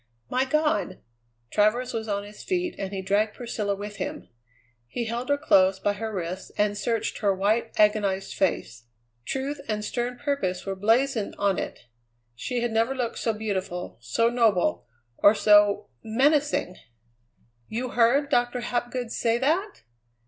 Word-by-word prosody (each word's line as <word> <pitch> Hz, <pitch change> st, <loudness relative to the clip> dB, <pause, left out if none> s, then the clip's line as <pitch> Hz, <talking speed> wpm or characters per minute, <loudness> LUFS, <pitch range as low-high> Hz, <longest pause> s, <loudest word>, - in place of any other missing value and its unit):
"My 255 Hz, +1 st, +2 dB
God!" 300 Hz, -8 st, 0 dB, 0.5 s
Travers 215 Hz, +4 st, +2 dB
was 225 Hz, -1 st, -3 dB
on 200 Hz, -1 st, -1 dB
his 205 Hz, +1 st, -11 dB
feet, 360 Hz, -2 st, -1 dB
and 195 Hz, -1 st, -3 dB
he 190 Hz, -1 st, -4 dB
dragged 210 Hz, +3 st, +1 dB
Priscilla 220 Hz, -4 st, -2 dB
with 205 Hz, +1 st, -7 dB
him. 295 Hz, +1 st, -5 dB, 0.6 s
He 235 Hz, -, -3 dB
held 235 Hz, +4 st, -3 dB
her 285 Hz, -, +3 dB
close 190 Hz, -10 st, +4 dB
by 205 Hz, +1 st, 0 dB
her 220 Hz, +2 st, -4 dB
wrists 185 Hz, -1 st, -5 dB
and 210 Hz, 0 st, +2 dB
searched 225 Hz, +2 st, -2 dB
her 200 Hz, -2 st, +2 dB
white, 215 Hz, +4 st, +1 dB
agonized 205 Hz, -2 st, +2 dB
face. 120 Hz, -, -1 dB, 0.4 s
Truth 270 Hz, -, -3 dB
and 210 Hz, -1 st, -2 dB
stern 245 Hz, +1 st, -2 dB
purpose 260 Hz, -10 st, -2 dB
were 195 Hz, -1 st, -3 dB
blazoned 225 Hz, +3 st, +1 dB
on 200 Hz, -2 st, +1 dB
it. -, -, -5 dB, 0.5 s
She 240 Hz, -, -3 dB
had 240 Hz, -1 st, -1 dB
never 230 Hz, +4 st, +1 dB
looked 245 Hz, -3 st, -2 dB
so 230 Hz, -, +1 dB
beautiful, 195 Hz, -5 st, -4 dB
so 120 Hz, -, +1 dB
noble, 200 Hz, -, +2 dB, 0.3 s
or 205 Hz, +2 st, +6 dB
so 205 Hz, -1 st, +4 dB
menacing. 275 Hz, -, +1 dB, 0.9 s
"You 245 Hz, +3 st, -3 dB
heard 245 Hz, +5 st, +3 dB
Doctor 245 Hz, +1 st, +1 dB
Hapgood 240 Hz, 0 st, -2 dB
say 230 Hz, 0 st, +1 dB
that?" 330 Hz, -, 0 dB
220 Hz, 150 wpm, -26 LUFS, 200-250 Hz, 0.9 s, or